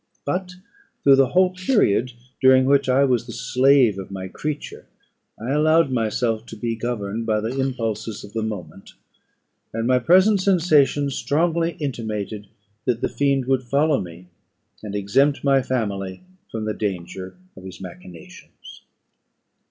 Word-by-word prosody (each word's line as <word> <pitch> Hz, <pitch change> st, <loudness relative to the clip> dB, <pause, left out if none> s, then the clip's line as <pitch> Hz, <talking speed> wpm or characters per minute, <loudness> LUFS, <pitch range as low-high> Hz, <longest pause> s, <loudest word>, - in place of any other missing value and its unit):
But 180 Hz, +5 st, -2 dB, 0.5 s
through 135 Hz, -1 st, +6 dB
the 135 Hz, -1 st, +5 dB
whole 185 Hz, +7 st, +3 dB
period 180 Hz, -, +1 dB, 0.3 s
during 130 Hz, 0 st, +6 dB
which 140 Hz, 0 st, +3 dB
I 130 Hz, +2 st, +4 dB
was 125 Hz, -3 st, +1 dB
the -, -, -7 dB
slave 130 Hz, -5 st, +3 dB
of 95 Hz, -, -8 dB
my 95 Hz, -1 st, -6 dB
creature, 150 Hz, +8 st, -6 dB, 0.5 s
I 115 Hz, +4 st, -4 dB
allowed 155 Hz, 0 st, +3 dB
myself 115 Hz, -1 st, -1 dB
to -, -, -9 dB
be 115 Hz, -1 st, -3 dB
governed 115 Hz, -1 st, -4 dB
by 110 Hz, -1 st, +2 dB
the 115 Hz, +4 st, -3 dB
impulses 115 Hz, -5 st, -3 dB
of 100 Hz, -, -12 dB
the 115 Hz, -, -2 dB
moment; 95 Hz, -5 st, -7 dB, 0.8 s
and 115 Hz, +1 st, -3 dB
my 125 Hz, +1 st, +3 dB
present 185 Hz, -, +4 dB
sensations 155 Hz, -7 st, +3 dB
strongly 165 Hz, +4 st, 0 dB
intimated 110 Hz, -8 st, -5 dB, 0.4 s
that 120 Hz, -2 st, 0 dB
the -, -, 0 dB
fiend 140 Hz, -2 st, 0 dB
would 130 Hz, 0 st, +1 dB
follow 140 Hz, +3 st, +1 dB
me, 85 Hz, 0 st, -10 dB, 0.6 s
and 105 Hz, -1 st, -6 dB
exempt 135 Hz, +9 st, +1 dB
my 135 Hz, -1 st, +4 dB
family 100 Hz, -, -3 dB, 0.3 s
from 110 Hz, -1 st, -4 dB
the 110 Hz, -, -1 dB
danger 95 Hz, -2 st, -5 dB, 0.2 s
of 95 Hz, -, -12 dB
his 95 Hz, -1 st, -10 dB
machinations. 90 Hz, -2 st, -12 dB
125 Hz, 145 wpm, -22 LUFS, 105-140 Hz, 0.8 s, through